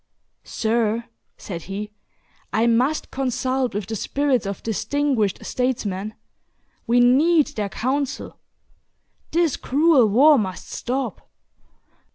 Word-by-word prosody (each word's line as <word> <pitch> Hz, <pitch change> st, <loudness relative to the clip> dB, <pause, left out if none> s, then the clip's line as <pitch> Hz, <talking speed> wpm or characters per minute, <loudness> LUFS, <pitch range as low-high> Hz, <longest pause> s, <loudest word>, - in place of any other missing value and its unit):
"Sir," 230 Hz, 0 st, 0 dB, 0.3 s
said 175 Hz, -5 st, -7 dB
he, 210 Hz, +2 st, -5 dB, 0.6 s
"I 220 Hz, +4 st, +2 dB
must 250 Hz, +6 st, +1 dB
consult 255 Hz, -2 st, -1 dB
with 205 Hz, -1 st, -2 dB
the 220 Hz, +3 st, -4 dB
spirits 265 Hz, 0 st, 0 dB
of 200 Hz, -, -5 dB
distinguished 225 Hz, -1 st, -1 dB
statesmen. 215 Hz, -5 st, -2 dB, 0.7 s
We 240 Hz, +2 st, +4 dB
need 290 Hz, +6 st, +5 dB
their 205 Hz, -2 st, -2 dB
counsel. 265 Hz, +6 st, -3 dB, 0.9 s
This 335 Hz, -3 st, +1 dB
cruel 290 Hz, -3 st, +4 dB
war 280 Hz, +7 st, +6 dB
must 190 Hz, -3 st, -5 dB
stop. 260 Hz, +2 st, -4 dB
245 Hz, 105 wpm, -22 LUFS, 215-275 Hz, 0.9 s, war